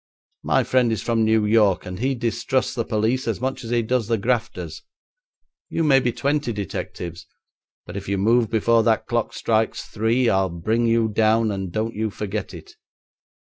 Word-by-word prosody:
'My - - +2
friend 125 -3 +2
is 110 -2 -2
from 115 -1 +1
New 110 -1 +3
York 105 -3 +3
and 90 0 -6
he 135 +3 0
distrusts 120 +2 -1
the 120 - -1
police 115 +4 0
as 115 - -1
much 130 +1 -3
as 115 - -7
he 120 -1 +1
does 120 -1 0
the 115 -1 +1
grafters. 95 -9 -2 0.9
You 165 - -1
may 140 -3 +5
be 125 -2 0
twenty 140 +1 -1
detectives, 90 -4 -6 0.6
but - - -9
if 100 -1 -6
you 100 - 0
move 115 +3 +3
before 115 +1 +3
that 110 -1 +1
clock 120 -2 -1
strikes 110 0 0
three, 115 +3 +1
I'll 95 -3 +2
bring 110 +8 0
you 115 0 +3
down, 110 +1 +2
and 95 -2 -4
don't 110 +4 -2
you 110 +1 -2
forget 105 0 -4
it.' - - -11
115 Hz, 185 wpm, -23 LUFS, 105-120 Hz, 0.9 s, may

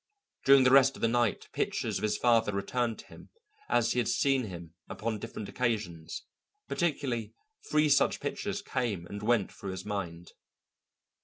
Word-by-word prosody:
During 135 -1 +7
the 130 - +5
rest 135 0 +6
of - - -10
the - - +5
night 120 -2 +1
pictures - - -1
of - - -10
his 105 -1 0
father 115 -3 +3
returned 115 +4 -1
to - - -12
him - - -14 0.4
as 120 -1 +3
he 125 - +1
had 120 - 0
seen 135 -3 +2
him 85 -4 -9 0.2
upon 110 -1 -3
different 110 -1 -6
occasions, 105 -10 -3 0.4
particularly 135 - -1 0.3
three 150 0 +3
such 140 -1 +3
pictures 200 +7 -3
came 115 - -2
and 100 +3 -7
went 110 -2 +1
through 100 - -8
his 95 -1 -6
mind. 90 -5 -5
115 Hz, 165 wpm, -30 LUFS, 100-130 Hz, 0.4 s, During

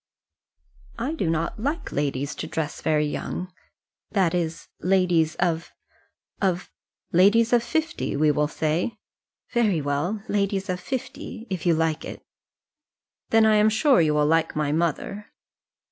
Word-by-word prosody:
"I 260 +7 -2
do 190 - -1
not 165 +5 -1
like 290 +8 -2
ladies 140 0 -1
to - - -4
dress 160 -2 -3
very 150 -1 +2
young, 180 +4 -4 0.6
that 190 -5 +2
is, 165 -2 -2
ladies 180 -4 +2
of 170 -1 -1 0.7
of 180 -3 0 0.2
" - - -55
"Ladies 215 +7 +5
of 240 - +5
fifty, 320 +6 -2
we 150 +1 +4
will 150 +1 +1
say?" 160 +8 -1 0.5
"Very 220 -8 +2
well; 150 +9 -2
ladies 200 -1 0
of 180 - -3
fifty, 235 +1 -6
if 180 -3 -2
you 170 - +5
like 160 -1 0
it." - - -8 1.1
"Then 225 0 +5
I 215 -1 +5
am 210 +1 +5
sure 240 - +4
you 155 -2 +2
will 150 0 +3
like 165 +1 +2
my 150 -1 0
mother." 170 +6 -1
180 Hz, 145 wpm, -25 LUFS, 155-215 Hz, 1.1 s, Ladies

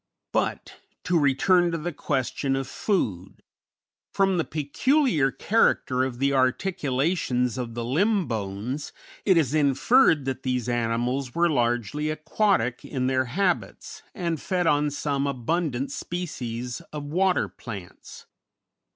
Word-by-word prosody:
But, - - -2 0.3
to 180 -2 +2
return 175 +6 +3
to 165 - -1
the 170 +2 -4
question 135 -1 -1
of 135 0 -2
food. 105 - -2 0.7
From 195 -2 +2
the - - +2
peculiar 160 - +1
character 135 - +2
of 130 -2 -3
the 140 +2 +1
articulations 130 - 0
of 120 -3 -5
the 120 -1 -3
limb 190 - +2
bones, 110 +5 -4 0.3
it 190 -4 +5
is 150 -5 +2
inferred 150 - +4
that 130 -1 -3
these 125 -3 -1
animals 120 +2 -1
were 170 0 +3
largely 120 +3 0
aquatic 155 - 0
in 130 -3 -3
their 130 0 +1
habits, 180 +9 -2
and 170 -6 -2
fed 180 -2 -1
on 150 -1 +3
some 140 -1 -1
abundant 140 +1 -1
species 125 -7 -5
of 150 -1 -5
water 180 +5 +1
plants. 100 -8 -10
140 Hz, 125 wpm, -25 LUFS, 125-170 Hz, 0.7 s, it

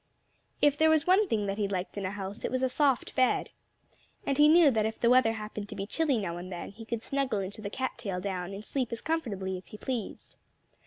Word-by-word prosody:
If 290 0 +4
there 315 0 +5
was 315 -2 +4
one 385 +3 +4
thing 210 - 0
that 200 +1 -3
he 205 - +1
liked 185 -2 -3
in 200 -2 -2
a - - -2
house 200 0 -6
it - - 0
was 255 0 -1
a 260 - +3
soft 275 -2 +1
bed. 255 -1 +2 0.7
And 275 0 0
he 300 +1 +8
knew 325 -2 +7
that 220 -3 +1
if 220 - -6
the 235 - +4
weather 250 -3 +5
happened 210 -1 -6
to - - -6
be 195 - -3
chilly 285 +4 +1
now 175 -5 -3
and 180 +2 -7
then, 175 +1 -6
he 225 +3 -11
could 225 0 -4
snuggle 275 -5 -1
into 195 +2 -5
the 200 - -4
cat 260 +5 -3
tail 190 -3 -3
down 185 -1 -3
and 200 +2 -7
sleep 255 -4 -2
as 230 - -3
comfortably 200 - -2
as 185 - -18
he 210 - -10
pleased. 240 -3 -5
220 Hz, 250 wpm, -29 LUFS, 195-270 Hz, 0.7 s, he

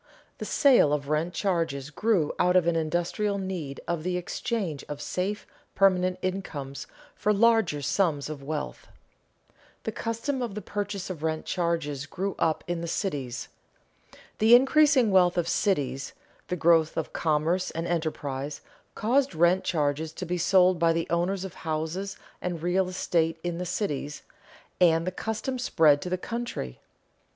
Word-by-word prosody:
_The - - -4
sale 255 - +5
of 145 -1 -2
rent 155 +3 0
charges 165 -8 -1
grew 190 -2 +1
out 180 0 +3
of 180 -2 +5
an 170 -1 +2
industrial 175 +6 0
need 180 -8 -4
of 170 -2 -1
the 180 +2 -1
exchange 180 - -3
of 145 -1 -5
safe 185 +7 -3 0.3
permanent 185 -2 +3
incomes 150 -8 -4 0.3
for 210 - 0
larger 210 -8 +3
sums 145 -1 +1
of 150 -2 -6
wealth._ 150 +2 -5 0.9
The - - -2
custom 235 +4 -3
of 230 -5 -3
the 210 - -4
purchase 200 -2 -4
of 165 -5 -7
rent 160 0 -2
charges 165 -6 -1
grew 195 +6 -3
up 160 -1 +1
in 175 -1 -3
the 170 - -4
cities. 140 - -3 0.9
The 225 +2 +8
increasing 270 -2 +5
wealth 180 -2 +4
of 170 -1 +1
cities, 140 -9 0 0.3
the 180 - -1
growth 165 -2 +3
of - - -3
commerce 165 +4 +1
and 165 +1 -4
enterprise, 150 -4 -3 0.3
caused 255 +1 +1
rent 175 +3 +4
charges 155 -1 0
to 185 - -5
be 180 +1 -2
sold 185 0 +4
by 165 0 +4
the 165 0 -1
owners 180 +3 0
of 190 - -7
houses 165 +5 -3 0.2
and 175 -3 -3
real 180 +1 +1
estate 165 -3 0
in 175 -1 -3
the 180 - -3
cities, 150 -6 -3 0.6
and 165 -2 +4
the 185 - -1
custom 225 +6 -3
spread 155 - +4
to 180 - -4
the 185 - 0
country. 230 - -5
175 Hz, 155 wpm, -27 LUFS, 155-195 Hz, 0.9 s, The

